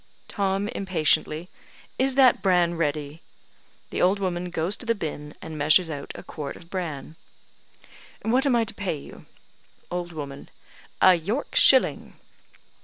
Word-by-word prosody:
Tom 195 0 -1
(impatiently): 160 -3 0 0.5
"Is 265 0 +2
that 260 -6 +5
bran 180 -3 +3
ready?" 150 -1 -2 0.7
(The - - -2
old 190 +3 +4
woman 180 -2 -2
goes 175 +3 0
to - - -6
the 230 - +2
binn, 150 -5 -6
and 155 -1 -7
measures 155 +3 +4
out 140 -2 -6
a - - -9
quart 145 -2 -6
of 170 - -15
bran.) 160 -4 -5 1.1
"What 255 +5 +2
am 255 - +3
I 235 - +3
to 225 - -2
pay 190 -6 -3
you?" 140 - -13 0.6
Old 175 -1 -3
woman: 140 -3 -8 0.5
"A 185 - +9
York 200 - -2
shilling." 260 -1 +4
175 Hz, 145 wpm, -25 LUFS, 155-200 Hz, 1.1 s, A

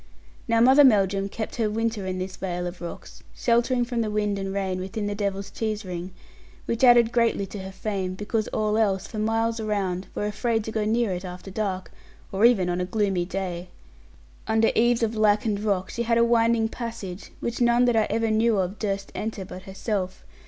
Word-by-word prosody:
Now 230 -1 +3
Mother 265 +4 +7
Melldrum 200 -5 +3
kept 220 +3 -5
her 225 -3 +1
winter 220 -2 -1
in 185 0 -2
this 185 0 -4
vale 180 -2 -3
of 175 0 -6
rocks, 170 - -8
sheltering 240 +1 +2
from 240 -1 -1
the 220 - -1
wind 210 -1 0
and 195 0 -3
rain 190 -2 -2
within 195 +3 -4
the 205 - -1
Devil's 200 -1 -3
Cheese 215 -1 -3
ring, 180 0 -5 0.6
which 230 +2 -2
added 240 -2 +7
greatly 230 -4 +2
to 200 +2 -8
her 190 0 -7
fame 190 -1 -3
because 215 +2 -2
all 215 0 0
else, 195 -3 +1
for 215 - -6
miles 225 +1 0
around, 195 -4 -2
were - - -1
afraid 220 +1 0
to 220 - -5
go 220 -1 -1
near 225 0 +1
it 180 +1 -4
after 180 +1 -8
dark, 190 -2 -3 0.4
or 195 +4 +3
even 220 -7 +4
on 175 0 -1
a - - 0
gloomy 195 -3 0
day. 180 -1 -4 0.8
Under 220 0 +3
eaves 240 +1 +3
of 225 0 +1
lichened 210 -1 +2
rock 195 -3 0
she 235 - -3
had 235 0 +2
a 235 - +5
winding 230 -1 +3
passage, 225 -6 -7
which 235 +1 -3
none 240 +1 +4
that 240 -1 +2 0.2
ever 225 0 +1
I - - +1
knew 220 0 +3
of 190 +2 -2
durst 195 -2 -2
enter 215 -3 -4
but 185 0 -9
herself. 190 -1 -3
210 Hz, 200 wpm, -25 LUFS, 190-230 Hz, 0.8 s, Mother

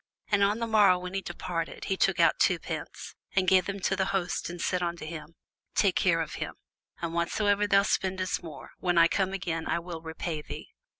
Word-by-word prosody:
And 205 -1 +4
on 205 +2 +3
the 230 - -1
morrow 210 -5 +5
when 180 +1 -6
he 195 - -1
departed, 165 -3 -4
he 190 - 0
took - - +2
out - - +4
two - - +4
pence, - - -6 0.2
and 190 -1 +3
gave 185 0 +5
them 200 0 -3
to 195 - +1
the 190 -1 +1
host, 190 -3 -1
and 175 0 -7
said 180 +1 0
unto 170 -2 -3
him, 155 0 -8 0.4
Take 195 -3 +3
care 170 -3 +3
of 160 - -4
him; - - -4 0.5
and 165 -1 -2
whatsoever 205 +4 +1
thou 200 0 +5
spendest 190 -2 0
more, 160 -4 -10
when 175 -1 +1
I 165 0 +8
come 190 +2 0
again, 175 -4 -3
I - - +1
will 170 -1 -6
repay 160 -1 -4
thee. - - -8
180 Hz, 215 wpm, -28 LUFS, 170-195 Hz, 0.5 s, I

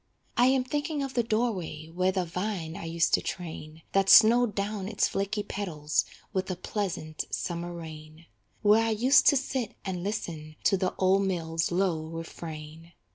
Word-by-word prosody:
I 245 - +5
am 260 -1 +3
thinking 290 +2 -2
of 270 -1 -4
the 240 - +2
door 230 +1 +1
way 160 -5 -7
Where 185 +2 +2
the 185 -1 -1
vine 180 -2 -3
I - - -6
used 165 +1 +1
to - - +4
train, 160 -3 -6
That 195 0 +2
snowed 230 0 +7
down 200 -1 -2
its 205 0 +1
flaky 200 +2 -2
petals 160 -8 -1 0.3
With 190 -1 -1
a 185 - -1
pleasant 180 -4 -4
summer 175 0 -3
rain; 160 -1 -10 0.4
Where 215 +2 +5
I 225 - +1
used 240 +6 +4
to 285 - +7
sit 260 -2 -3
and 185 -2 -3
listen 165 -7 -4
To - - +4
the 185 -1 -1
old 195 +1 +3
mill's 165 -3 -1
low 175 -3 0
refrain. 165 0 -8
185 Hz, 175 wpm, -28 LUFS, 165-215 Hz, 0.4 s, snowed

